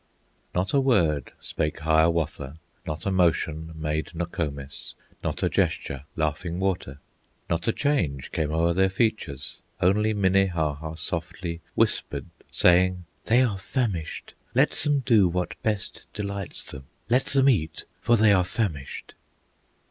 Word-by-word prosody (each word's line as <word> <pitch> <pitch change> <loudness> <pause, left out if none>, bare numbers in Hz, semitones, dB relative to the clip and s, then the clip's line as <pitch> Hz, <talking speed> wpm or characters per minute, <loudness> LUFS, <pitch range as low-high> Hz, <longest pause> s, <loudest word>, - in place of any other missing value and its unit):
Not 90 +2 0
a 140 - +5
word 90 - +2
spake 75 +1 -3
Hiawatha, 80 -2 +1 0.3
Not 75 -1 -4
a 100 - +1
motion 80 -3 +1
made 80 +1 -3
Nokomis, 75 -5 -4 0.3
Not - - -2
a - - +4
gesture 70 0 -1
Laughing 80 +3 -1
Water; 95 -8 -1 0.5
Not 85 0 0
a - - +5
change 90 - 0
came 75 -2 -1
o'er 85 +2 +2
their 95 +2 +3
features; 95 - -1 0.2
Only 105 +4 +3
Minnehaha 85 -6 +1
softly 85 0 -4
Whispered, - - +1 0.2
saying, 90 0 +4 0.2
"They 120 +3 +5
are 105 -6 0
famished; 100 - -3 0.2
Let - - +5
them 145 -2 +1
do 110 -7 +5
what 90 +1 -2
best 105 -3 -2
delights 100 -3 -4
them; 65 - -9 0.2
Let 125 +3 +3
them 135 -1 +3
eat, 80 - +1 0.2
for 120 - +4
they 105 -1 +6
are 90 -2 +4
famished." 90 - -3
90 Hz, 135 wpm, -26 LUFS, 80-100 Hz, 0.5 s, they